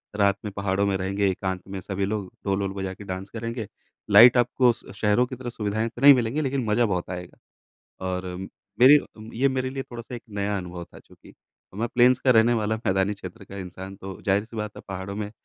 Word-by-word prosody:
रात 100 -1 +3
में 105 - -3
पहाड़ों 100 0 0
में 100 - +1
रहेंगे 100 +1 0
एकांत 95 0 -3
में 95 0 -5
सभी 95 +1 -2
लोग, 100 -2 -3
ढोल-वोल 100 0 0
बजा 95 -1 -4
के 100 +2 -11
डांस 95 0 -6
करेंगे, 115 0 -5 0.4
लाइट 125 +2 +9
आपको 125 0 +4
श - - -14
शहरों 105 +3 +2
की 130 +1 -7
तरह 125 -1 -6
सुविधाएँ 110 0 -2
तो 120 - -12
नहीं 140 +1 +10
मिलेंगी 125 +3 0
लेकिन 135 -3 -1
मज़ा 110 +3 +2
बहुत 90 -5 -2
आएगा। 90 -1 -7 0.7
और 90 0 -3 0.5
मेरी 135 +4 +9
अ, - - -8 0.3
ये 135 +4 +3
मेरे 130 -1 -1
लिए 135 0 -4
थोड़ा-सा 120 -1 -9
एक 120 - -7
नया 100 0 -2
अनुभव 90 -1 -7
था - - -16
चूँकि, - - -18
तो - - -23
मैं 120 - -1
प्लेन्स 125 +1 +5
का 130 - +3
रहने 115 0 +5
वाला 110 -1 0
मैदानी 95 +2 +1
क्षेत्र 100 +1 -10
का 95 - -11
इंसान 95 +1 -8
तो 95 0 -9
ज़ाहिर 100 +1 +2
सी 115 0 -12
बात 105 -1 -4
है - - -9
पहाड़ों 95 +1 -5
में 105 -1 -4
105 Hz, 220 wpm, -25 LUFS, 95-120 Hz, 0.7 s, नहीं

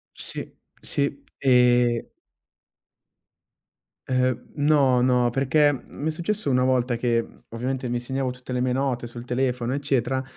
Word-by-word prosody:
Sì. - - -8 0.3
Sì. 140 0 -2
Ehm 125 -2 +3 2.0
Ehm, 130 -1 0
no, 145 -4 +4
no, 125 -1 +3
perché, 140 +4 +3
mhmm, 135 - -7 0.2
mi 155 - 0
è - - +2
successo 170 +1 -2
una 125 -1 +3
volta 125 -2 +1
che 120 -1 +1
mhmm, - - -17
ovviamente 125 +2 -3
mi 120 0 -1
segnavo 130 +1 -2
tutte 125 0 -8
le 125 - 0
mie 125 0 +1
note 125 -2 -1
sul 120 0 -9
telefono 125 0 -1
eccetera, 135 -2 0
125 Hz, 145 wpm, -24 LUFS, 120-135 Hz, 2.0 s, no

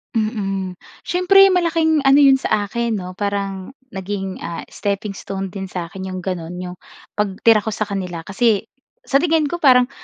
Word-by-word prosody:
Mm. 195 -4 -2 0.2
Siyempre 390 +2 +5
malaking 330 -4 +2
ano 270 +1 +6
'yon 270 -1 +7
sa 205 -5 -1
akin 235 0 -1
'no? 180 0 -8
Parang 200 0 -3 0.2
naging, 195 -2 -5
ah, 170 - -5
steppingstone 195 -1 -4
din 195 +1 -6
sa'kin 185 0 -6
'yong 185 -1 -5
gano'n 175 -2 -4
'yong 180 0 -7 0.4
pagtira 210 +1 +3
ko 220 - -2
sa 215 0 -3
kanila 180 -4 -4
kasi 200 +4 0 0.3
sa 275 - +2
tingin 310 -1 +2
ko 345 - -3
parang 255 -5 +5
205 Hz, 155 wpm, -20 LUFS, 190-265 Hz, 0.4 s, yon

